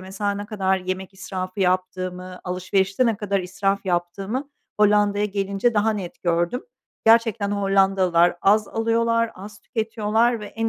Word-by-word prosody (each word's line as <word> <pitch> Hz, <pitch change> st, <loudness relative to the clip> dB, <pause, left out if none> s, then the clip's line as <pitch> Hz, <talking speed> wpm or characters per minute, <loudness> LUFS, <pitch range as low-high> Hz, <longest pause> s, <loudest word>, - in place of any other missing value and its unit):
mesela, 195 Hz, +2 st, -3 dB
ne 205 Hz, 0 st, -4 dB
kadar 190 Hz, -3 st, 0 dB
yemek 185 Hz, +1 st, -5 dB
israfı 185 Hz, 0 st, -5 dB
yaptığımı, 185 Hz, 0 st, -2 dB
alışverişte 190 Hz, +5 st, 0 dB
ne 225 Hz, -3 st, +1 dB
kadar 200 Hz, -2 st, -1 dB
israf 195 Hz, +2 st, -1 dB
yaptığımı 195 Hz, +10 st, -2 dB, 0.3 s
Hollanda'ya 205 Hz, 0 st, +3 dB
gelince 200 Hz, +3 st, 0 dB
daha 210 Hz, +1 st, +3 dB
net 190 Hz, -5 st, -7 dB
gördüm. 175 Hz, +7 st, 0 dB, 0.4 s
Gerçekten 225 Hz, -3 st, +4 dB
Hollandalılar 195 Hz, -3 st, +3 dB
az 210 Hz, +1 st, +4 dB
alıyorlar, 230 Hz, 0 st, +1 dB
az 205 Hz, +2 st, -11 dB
tüketiyorlar 225 Hz, +1 st, 0 dB
ve 210 Hz, -, -7 dB
en 225 Hz, +1 st, -2 dB
200 Hz, 135 wpm, -23 LUFS, 185-215 Hz, 0.4 s, Gerçekten